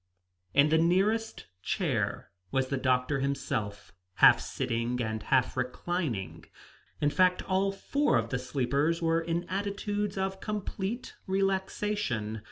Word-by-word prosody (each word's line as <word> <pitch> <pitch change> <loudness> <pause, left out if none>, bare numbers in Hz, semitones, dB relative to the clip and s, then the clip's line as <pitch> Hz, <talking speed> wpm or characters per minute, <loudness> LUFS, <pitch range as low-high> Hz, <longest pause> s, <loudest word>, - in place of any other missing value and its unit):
In 140 +2 +6
the 160 +1 +4
nearest 200 +7 +1 0.2
chair - - -1 0.2
was 130 +4 0
the 140 - 0
doctor 130 +2 +1
himself, 110 -8 -3 0.2
half - - +7
sitting 115 +2 -2
and 110 -2 -2
half 130 - +2
reclining; 125 - -3 0.5
in 145 0 +2
fact, 185 +1 +3
all 195 +1 +1
four 275 - +1
of 115 0 -1
the 130 - 0
sleepers 140 +5 0
were 165 -1 +2
in 170 +1 -1
attitudes 200 +2 -2
of 190 0 -2
complete 210 +2 -4
relaxation. 190 - -1
165 Hz, 125 wpm, -29 LUFS, 125-195 Hz, 0.5 s, half